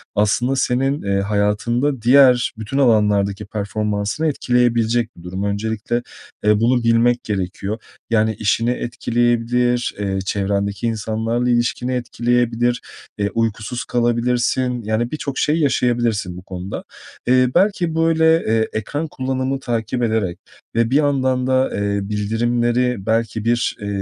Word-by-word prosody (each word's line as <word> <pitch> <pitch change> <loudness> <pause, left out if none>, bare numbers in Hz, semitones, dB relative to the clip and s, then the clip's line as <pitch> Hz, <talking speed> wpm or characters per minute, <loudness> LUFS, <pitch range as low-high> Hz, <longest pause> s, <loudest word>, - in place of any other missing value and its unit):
aslında 120 +6 +2
senin, 135 +3 0
eee, 100 0 0
hayatında 105 +6 0
diğer 125 0 +5
bütün 110 +5 -4
alanlardaki 105 -5 +2
performansını 105 +5 -2
etkileyebilecek 120 -4 +1
bir 85 - -13
durum. 95 +2 -4
Öncelikle, 110 +3 -2 0.4
eee, 105 0 +4
bunu 120 +2 +2
bilmek 115 +1 +3
gerekiyor 95 +1 -3 0.3
yani 110 -1 +2
işini 110 +4 +1
etkileyebilir, 120 0 0
eee, 95 -1 -1
çevrendeki 100 +2 -1
insanlarla 115 +2 -1
ilişkini 120 +1 0
etkileyebilir, 120 0 0 0.4
eee, 100 0 0
uykusuz 115 +1 -2
kalabilirsin 120 0 +1 0.4
yani 110 +3 -1
birçok 140 -3 -4
şey 150 - +2
yaşayabilirsin 120 - 0
bu - - -8
konuda. 95 0 -6 0.4
Eee, 125 0 +4
belki, 180 -3 +2
böyle, 165 0 +2 0.2
eee, 110 0 +1
ekran 145 +9 -3
kullanımı 130 -1 -2
takip 120 -1 -2
ederek 110 -6 -1 0.4
ve 115 0 +2
bir - - +2
yandan 130 -3 +2
da, 130 0 +2
eee, 100 0 -1
bildirimleri 120 +2 0
belki 110 -1 -1
bir, 120 0 +1
eee, 100 - -5
115 Hz, 125 wpm, -20 LUFS, 105-125 Hz, 0.4 s, diğer